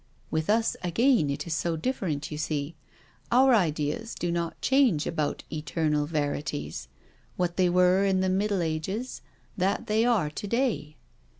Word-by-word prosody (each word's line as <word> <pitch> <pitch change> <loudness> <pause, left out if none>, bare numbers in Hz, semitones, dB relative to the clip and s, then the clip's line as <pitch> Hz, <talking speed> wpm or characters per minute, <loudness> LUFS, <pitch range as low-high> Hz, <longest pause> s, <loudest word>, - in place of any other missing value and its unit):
" - - -35
With 160 +2 -1
us 225 +1 +2
again 220 - +3
it 140 - -3
is 170 - -3
so 165 +2 -1
different, 160 - -2
you 150 - -4
see. 155 0 -2 0.6
Our 260 +2 +6
ideas 165 +2 0
do 175 - -2
not 170 -1 -2
change 260 - +3
about 155 -3 -2
eternal 150 -1 -1
verities 145 - -3 0.5
^what 175 -1 0
they 185 -1 +3
were 180 +2 +4
in 190 -1 +2
the 190 - +1
Middle 195 0 +1
Ages 180 +10 -3 0.4
that 195 +1 0
they 215 +1 +2
are 215 -11 +2
to 205 - -6
day." 195 - -1
175 Hz, 160 wpm, -27 LUFS, 150-210 Hz, 0.6 s, Our